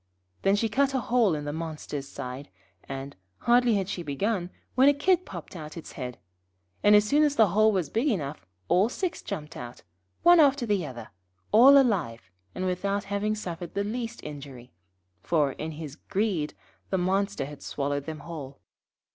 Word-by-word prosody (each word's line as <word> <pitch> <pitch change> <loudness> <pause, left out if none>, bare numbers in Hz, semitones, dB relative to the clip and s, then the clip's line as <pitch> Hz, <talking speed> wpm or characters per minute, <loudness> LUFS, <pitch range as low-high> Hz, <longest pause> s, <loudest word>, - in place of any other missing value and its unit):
Then 195 +1 +3
she 225 +2 +1
cut 275 +5 +1
a - - +2
hole 230 -6 +2
in 150 -1 -5
the 145 - -3
monster's 155 -3 -5
side, 130 +2 -7 0.4
and, 135 +1 -6 0.3
hardly 240 -1 +4
had 195 -2 0
she 190 -2 -4
begun, 175 +5 -1 0.2
when 265 +3 +6
a 285 - +3
Kid 365 +5 +2
popped 175 0 -8
out 155 -1 -8
its 165 - -8
head, 125 -1 -6 0.6
and 205 0 +6
as 210 0 +6
soon 290 +8 +3
as 295 -2 +3
the 220 -6 +5
hole 215 +4 +4
was 185 -7 -1
big 235 +7 +1
enough, 150 - -2 0.2
all 195 +5 +3
six 360 +6 -3
jumped 150 +1 -6
out, 120 -5 -8 0.4
one 350 0 +8
after 280 -4 +4
the 205 -5 +1
other, 120 -4 -9 0.4
all 255 +7 +8
alive, 160 - +1 0.2
and 185 - -2
without 200 +3 -1
having 210 +1 0
suffered 175 -4 -6
the 200 - +1
least 230 +2 -4
injury, 140 -4 -9 0.5
for, 150 - +1
in 155 +4 -6
his 150 -2 -7
greed, 190 -7 -1 0.3
the 190 - +1
monster 195 -2 0
had 145 +1 -10
swallowed 145 0 -2
them 155 -2 -5
whole. 145 -4 -8
185 Hz, 180 wpm, -27 LUFS, 150-225 Hz, 0.6 s, one